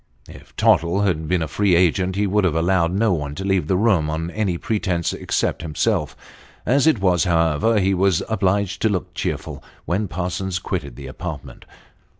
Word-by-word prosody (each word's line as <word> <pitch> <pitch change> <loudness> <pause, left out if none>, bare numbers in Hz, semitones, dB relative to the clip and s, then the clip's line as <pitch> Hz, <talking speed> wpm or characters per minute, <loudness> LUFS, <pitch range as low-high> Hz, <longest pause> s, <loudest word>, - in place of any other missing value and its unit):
If - - -15
Tottle 85 +4 +3
had 85 -6 0
been 90 0 +1
a - - -3
free 95 +4 +2
agent, 90 +2 +2
he 105 +1 +1
would 105 +1 +1
have 90 -4 +1
allowed 85 0 +2
no 100 +2 +2
one 75 -3 -3
to 95 - -5
leave 95 -6 +1
the 95 - +1
room 95 -8 +2
on 80 +2 -3
any 95 -4 -1
pretence, 90 -5 -1
except - - -1
himself. 80 -1 -1 0.5
As 135 +6 +3
it 155 -9 +3
was, 90 -1 +2
however, 85 +5 +2
ho 95 0 +2
was 95 -2 +2
obliged 100 -2 0
to 110 - +3
look 95 -4 -3
cheerful - - -4 0.2
when 100 +4 -1
Parsons 90 +1 -3
quitted 70 - -4
the 70 - -9
apartment. 80 +2 -8
90 Hz, 180 wpm, -21 LUFS, 85-100 Hz, 0.5 s, Tottle